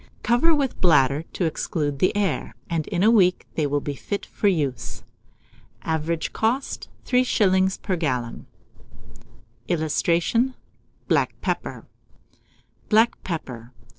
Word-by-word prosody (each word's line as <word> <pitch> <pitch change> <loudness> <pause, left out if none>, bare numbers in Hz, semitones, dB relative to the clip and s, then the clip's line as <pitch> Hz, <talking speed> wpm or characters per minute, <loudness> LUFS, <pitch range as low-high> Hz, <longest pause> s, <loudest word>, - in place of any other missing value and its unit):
Cover 255 +8 +4
with 280 -3 -1
bladder 145 -3 +4
to 180 - -1
exclude 150 -2 -2
the 185 +5 +2
air, 200 -2 -1 0.2
and 160 -2 -1
in 180 -2 0
a 220 - +6
week 185 -6 +4
they 155 -2 0
will 145 +1 0
be 145 - -3
fit 200 +8 -4
for 205 - -1
use. 135 - -1 0.8
Average 160 +1 -2
cost, 245 +5 -1 0.2
3s. 190 -7 +2
per 185 - 0
gallon. 130 -8 -3 1.2
[Illustration: 175 - +1 0.5
BLACK - - +1
PEPPER.] - - -3 1.0
BLACK 225 +2 +3
PEPPER. 125 -8 -6
175 Hz, 115 wpm, -24 LUFS, 145-210 Hz, 1.2 s, a